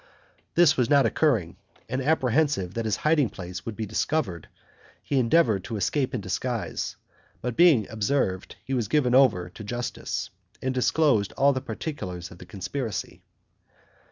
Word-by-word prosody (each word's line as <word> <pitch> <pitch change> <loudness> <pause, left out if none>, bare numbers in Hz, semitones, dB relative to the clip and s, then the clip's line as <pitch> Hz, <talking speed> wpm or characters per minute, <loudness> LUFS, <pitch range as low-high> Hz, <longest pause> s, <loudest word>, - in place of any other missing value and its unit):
This 165 -3 +6
not 140 -2 +5
occurring, 115 - +1 0.3
and 130 +1 -2
apprehensive 135 - +1
that 115 0 -3
his 110 - +1
hiding 150 -6 +4
place 90 0 -8
would 115 - -4
be 110 - -3
discovered, 105 - -1 0.6
he 140 - +1
endeavored 115 - +3
to 115 -3 -4
escape 130 +6 0
in 120 - -2
disguise, 110 +5 -3 0.4
but 125 -1 -3
being 160 - +5
observed, 110 -4 -1
he 135 - -3
was 120 -5 0
given 130 -1 +2
over 125 -10 +4
to 110 - -10
justice, 120 +3 -4 0.3
and 130 0 -2
disclosed 130 -4 +2
all 140 +1 +4
the 130 - -2
particulars 100 - -5
of 85 - -13
the 90 - -12
conspiracy. 100 +1 -4
120 Hz, 150 wpm, -26 LUFS, 100-140 Hz, 0.6 s, This